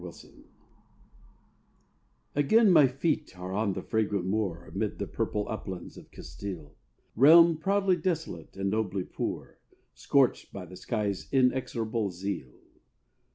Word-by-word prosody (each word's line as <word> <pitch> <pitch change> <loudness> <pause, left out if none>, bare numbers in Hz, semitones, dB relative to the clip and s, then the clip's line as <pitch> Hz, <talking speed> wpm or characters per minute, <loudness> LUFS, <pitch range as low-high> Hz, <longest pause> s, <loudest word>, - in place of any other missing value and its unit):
AVILA 85 -2 -11 2.0
Again 200 +9 +4
my 155 -6 +7
feet 135 - -2
are 90 +1 -6
on 100 0 0
the 95 - -5
fragrant 105 -4 -1
moor 95 -4 -2
Amid 100 +3 -3
the - - -3
purple 105 -1 -2
uplands 95 -4 -6
of - - -13
Castile, 80 -2 -8 0.4
Realm 165 +6 +7
proudly 195 +1 +1
desolate 165 - -4
and 95 0 -1
nobly 100 -3 -1
poor, - - -5 0.3
Scorched 135 -3 +1
by 95 -2 -7
the 90 +1 -12
sky's 100 0 -3
inexorable 120 -5 0
zeal. 90 -6 -5
110 Hz, 120 wpm, -28 LUFS, 95-140 Hz, 2.0 s, my